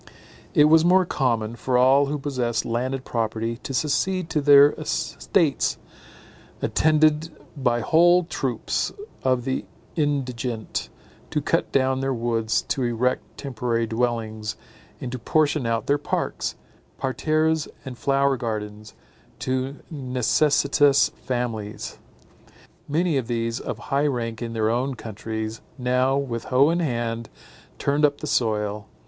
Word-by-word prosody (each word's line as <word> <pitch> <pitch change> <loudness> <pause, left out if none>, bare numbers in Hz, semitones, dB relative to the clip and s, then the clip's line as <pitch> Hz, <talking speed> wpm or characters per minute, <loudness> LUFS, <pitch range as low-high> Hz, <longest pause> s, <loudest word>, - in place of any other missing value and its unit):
It 150 - +7
was 160 +1 +6
more 185 +2 +5
common, 120 -8 0
for 125 +1 0
all 135 +3 +5
who 150 +1 -2
possessed 125 -5 -1
landed 130 +3 -2
property 115 0 -2
to 135 - -7
secede 160 +7 0
to 155 -2 +1
their 145 0 +8
estates, - - 0 0.8
attended 155 0 +3 0.3
by 120 -4 +1
whole 175 +8 +5
troops 130 -8 -2 0.3
of 130 -2 +1
the 130 -1 -1 0.3
indigent, 125 -6 -2 0.4
to - - 0
cut - - 0
down 130 -1 +2
their 135 -1 -1
woods 115 -2 0
to 135 - -2
erect 120 +1 -1
temporary 120 -3 -1
dwellings, 110 -2 -2 0.4
and 125 - -5
to 130 - -4
portion 150 +1 +1
out 115 0 0
their 145 +1 +2
parks, - - -2 0.4
parterres 155 +3 +1 0.2
and 130 -2 -6
flower 140 +1 +2
gardens, 105 -2 -5 0.4
to 130 +1 -2 0.2
necessitous 140 +1 +3
families. 115 -4 -4 0.9
Many 160 +1 +1
of 125 -4 -2
these, 115 0 -1
of 115 - -5
high 140 +5 0
rank 115 -4 -3
in 115 -1 -4
their 110 -1 +1
own 130 +3 -1
countries, 110 0 -5 0.2
now, 130 +1 +2
with 120 -5 -3
hoe 135 +4 +4
in 170 - 0
hand, 115 -6 -2 0.5
turned 145 +2 0
up 145 -1 +4
the - - -5
soil. 105 -5 0
130 Hz, 130 wpm, -24 LUFS, 115-145 Hz, 0.9 s, their